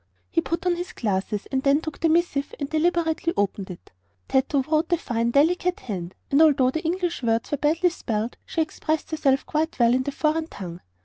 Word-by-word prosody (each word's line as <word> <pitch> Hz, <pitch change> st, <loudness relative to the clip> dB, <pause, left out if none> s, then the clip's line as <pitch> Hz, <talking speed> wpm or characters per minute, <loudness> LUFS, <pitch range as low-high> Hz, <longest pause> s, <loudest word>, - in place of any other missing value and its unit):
He 330 Hz, -, +2 dB
put 335 Hz, +2 st, -3 dB
on 350 Hz, -1 st, +2 dB
his 350 Hz, +1 st, -5 dB
glasses 205 Hz, -1 st, -2 dB
and 265 Hz, -1 st, +1 dB
then 280 Hz, +2 st, +4 dB
took 315 Hz, -2 st, -7 dB
the 330 Hz, -, +2 dB
missive 315 Hz, -4 st, +1 dB
and 285 Hz, -, -2 dB
deliberately 335 Hz, +1 st, +1 dB
opened 200 Hz, -1 st, -1 dB
it. 180 Hz, -, -11 dB, 0.4 s
Tato 270 Hz, +1 st, +2 dB
wrote 310 Hz, +4 st, 0 dB
a 345 Hz, -, +4 dB
fine, 235 Hz, -6 st, -1 dB
delicate 350 Hz, +7 st, +2 dB
hand, 185 Hz, -5 st, -5 dB, 0.2 s
and 280 Hz, +3 st, +5 dB
although 275 Hz, -5 st, +5 dB
the 315 Hz, -, -2 dB
English 350 Hz, 0 st, -1 dB
words 230 Hz, -1 st, 0 dB
were 290 Hz, -, +1 dB
badly 330 Hz, +4 st, +2 dB
spelled 225 Hz, -7 st, -3 dB
she 330 Hz, -, -2 dB
expressed 315 Hz, 0 st, -3 dB
herself 275 Hz, -4 st, +2 dB
quite 315 Hz, +2 st, -1 dB
well 235 Hz, -1 st, +4 dB
in 255 Hz, -, +2 dB
the 285 Hz, -, -3 dB
foreign 310 Hz, +2 st, 0 dB
tongue. 175 Hz, -, -8 dB
295 Hz, 200 wpm, -24 LUFS, 240-330 Hz, 0.4 s, and